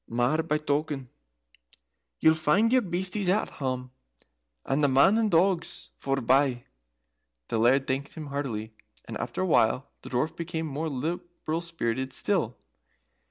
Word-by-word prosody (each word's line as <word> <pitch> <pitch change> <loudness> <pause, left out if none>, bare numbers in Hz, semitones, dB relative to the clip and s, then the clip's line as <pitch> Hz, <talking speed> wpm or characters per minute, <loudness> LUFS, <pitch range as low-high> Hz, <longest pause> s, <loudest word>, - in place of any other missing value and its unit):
Mair 120 +7 +2
by 155 -1 0
token, 145 -3 -2 1.1
ye'll 160 - +6
find 160 +9 +2
your 255 - +5
beasties 185 0 -1
at 205 +4 +1
hame, 130 -2 -3 0.7
and 140 +2 +1
the - - +6
men 140 +10 +5
and 225 -1 +2
the 165 - +4
dogs 180 0 0
forebye." 135 -1 +2 0.9
The 115 - 0
Laird 130 +4 +4
thanked 135 +2 -3
him 160 -2 -6
heartily, 125 -7 -4 0.3
and - - -7
after - - -3
a - - +1
while 60 - +2
the - - -9
Dwarf 155 +6 -1
became 165 -1 -3
more 155 +2 -3
liberal 165 +3 -3
spirited 130 -6 -2
still. 160 - -1
150 Hz, 145 wpm, -27 LUFS, 130-170 Hz, 1.1 s, ye'll